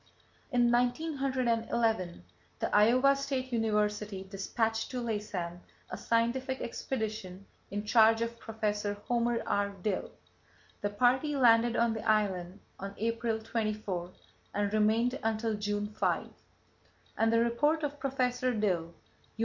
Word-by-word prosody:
In 240 -1 +3
1911, 240 - 0 0.3
the - - -1
Iowa 250 +6 +5
State 270 -2 -3
University 210 -3 0
despatched 220 +3 -2
to 255 - -3
Laysan 205 -7 -3 0.3
a - - -3
scientific 255 +3 0
expedition 215 -6 -4 0.2
in 205 +1 -4
charge 225 +1 +5
of 230 0 -5
Prof. 210 -2 -2
Homer 235 -1 +1
R. 200 0 +1
Dill. 205 -3 -1 0.7
The 205 - 0
party 255 +8 +2
landed 235 -2 +5
on 235 -1 +2
the 220 - -5
island 195 -3 0 0.2
on 195 +1 -6
April 230 0 -1
24 215 -5 -3 0.5
and 205 0 0
remained 225 +5 +2
until 225 0 0
June 205 0 -1
5, - - 0 0.9
and 225 0 +2
the 230 - +4
report 295 +7 +2
of 290 0 -3
Professor 255 -2 0
Dill 175 -6 -1 0.4
(U. - - -23
225 Hz, 125 wpm, -31 LUFS, 210-245 Hz, 0.9 s, Iowa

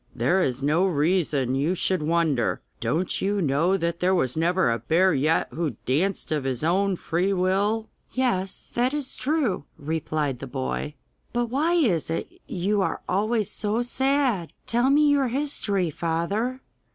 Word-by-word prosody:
'There 190 +2 +2
is 130 -3 -1
no 155 +5 +3
reason 150 -5 +1
you 145 +7 +1
should 185 -1 0
wonder! 155 -6 +1 0.2
Don't 155 +11 0
you 200 +1 0
know 165 +4 +2
that 170 -1 -2
there 185 +1 +2
was 130 -8 0
never 170 -2 +2
a 115 - -1
bear 185 +3 +3
yet 155 +4 +2
who 155 -9 -3
danced 170 +7 0
of 150 -3 0
his 130 0 -2
own 190 +4 +2
free 180 +3 -1
will?' 200 +4 +1 0.2
'Yes, 215 -8 -1
that 250 +4 +1
is 285 -3 -2
true,' 275 - 0
replied 150 -3 -2
the 135 - -6
boy. 135 +3 -3 0.4
'But 240 -1 -1
why 305 +6 +1
is 220 - +2
it 165 - -2 0.2
you 200 +3 0
are - - -2
always 215 +2 0
so 215 +3 -1
sad? 260 - 0
Tell 240 +3 +2
me 295 +2 +5
your 285 -2 +3
history, 225 - -1
father. 195 - -2
185 Hz, 160 wpm, -25 LUFS, 155-225 Hz, 0.4 s, me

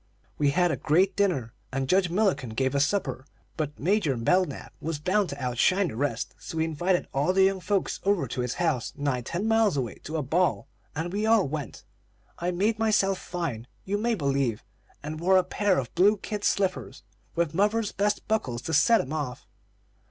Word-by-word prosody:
We 145 -1 +3
had 175 +4 +2
a - - -1
great 180 +6 +2
dinner, 160 - 0 0.2
and 135 0 -2
Judge 185 +3 +3
Mullikin 155 - 0
gave 130 +2 0
a 140 - +2
supper; 140 -5 0 0.3
but 150 -2 -3
Major 170 - +1
Belknap 155 +6 0
was 160 -1 -2
bound 185 +5 +1
to - - -6
outshine 140 +9 +2
the - - -7
rest, 125 -2 -2
so 160 - -7
he 160 - +2
invited 175 +3 0
all 145 +7 +1
the 190 0 +4
young 190 0 +2
folks 195 +1 -1
over 195 -8 +1
to 125 - -3
his 125 0 -2
house, 155 -9 -1
nigh 140 -3 -1
ten 175 - -3
miles 225 -7 +3
away, 120 -6 -3
to 160 +2 -3
a 150 - -1
ball, 170 +7 +1 0.3
and 165 +4 -3
we 210 +2 0
all 220 -6 +4
went. 145 -5 -6 0.6
I 175 - -1
made 205 +5 0
myself 205 -4 +2
fine, 145 -10 -4 0.2
you 205 +2 -1
may 235 +1 +1
believe, 140 - 0 0.4
and 155 +1 -5
wore 190 +3 +4
a 185 - +4
pair 205 -1 +1
of 125 -4 -3
blue 200 +5 +4
kid 205 +1 -5
slippers, 180 - -1 0.3
with 170 -2 0
mother's 210 +3 +1
best 205 +1 -1
buckles 130 - -1
to 160 - -4
set 225 +10 +5
'em 135 - -6
off. 145 -6 -4
170 Hz, 195 wpm, -27 LUFS, 140-195 Hz, 0.6 s, set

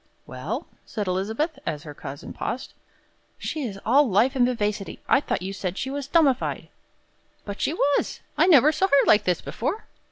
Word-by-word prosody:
"Well?" - - -5 0.2
said 210 -3 -4
Elizabeth, 220 - -1
as 150 -1 -4
her 150 - -8
cousin 140 -1 -8
paused. 255 - -4 0.6
"She 310 - -4
is 210 -7 -4
all 270 +3 +5
life 230 +8 +3
and 245 -2 +4
vivacity. 210 -4 -2
I - - +5
thought 185 - -2
you 195 +1 -4
said 190 -1 -4
she 265 - -3
was 280 -1 -4
'dummified.'" 280 -5 +2 0.8
"But 200 -1 -6
she 300 - +1
was. 285 -4 +1 0.2
I - - +4
never 300 -4 +7
saw 380 +4 +1
her 280 -7 +4
like 210 0 +5
this 180 -2 +1
before." 345 - -3
245 Hz, 180 wpm, -25 LUFS, 195-285 Hz, 0.8 s, never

